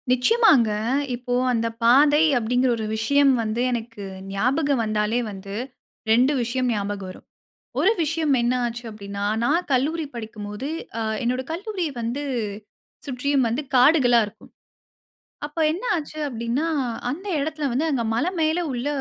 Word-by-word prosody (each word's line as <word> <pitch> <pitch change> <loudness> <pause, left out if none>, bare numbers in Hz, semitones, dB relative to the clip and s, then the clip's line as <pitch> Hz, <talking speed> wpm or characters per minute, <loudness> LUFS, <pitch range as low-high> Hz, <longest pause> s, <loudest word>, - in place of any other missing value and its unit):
நிச்சயமாங்க. 265 - +4 0.5
இப்போ 245 0 -4 0.2
அந்த 230 -1 0 0.2
பாதை 285 +5 +6 0.2
அப்படிங்கிற 245 +2 +1
ஒரு 220 - -3
விஷயம் 275 +5 +4
வந்து, 220 +2 -2
எனக்கு 230 -3 -5 0.3
ஞாபகம் 265 +6 +1
வந்தாலே 215 +2 0
வந்து 195 0 -8 0.6
2 250 +6 +4
விஷயம் 250 +2 -1
ஞாபகம் 200 -2 -3
வரும். 185 - -12 0.6
1 405 - +4
விஷயம் 315 -2 +1
என்ன 240 +1 +1
ஆச்சு 240 0 -4
அப்படின்னா, 200 -1 -6 0.2
நான் 330 +8 +1
கல்லூரி 305 +6 +1
படிக்கும்போது 215 0 -6 0.3
அ - - -1 0.2
என்னோட 250 +2 0
கல்லூரி 380 0 -3
வந்து 235 +5 -3 0.8
சுற்றியும் 270 0 +1
வந்து 240 +6 -1
காடுகளா 250 -2 +5
இருக்கும். 205 - -15 1.0
அப்ப 300 +3 -8
என்ன 360 - -6
ஆச்சு 310 -1 -5
அப்படின்னா, 235 +5 -2 0.4
அந்த 360 +9 -6
இடத்தில 305 0 -2
வந்து 280 +6 +1
அங்க 255 -5 0
மலை 305 +10 0
மேல 315 +2 +2
உள்ள 245 +3 -3
250 Hz, 135 wpm, -23 LUFS, 230-295 Hz, 1.0 s, பாதை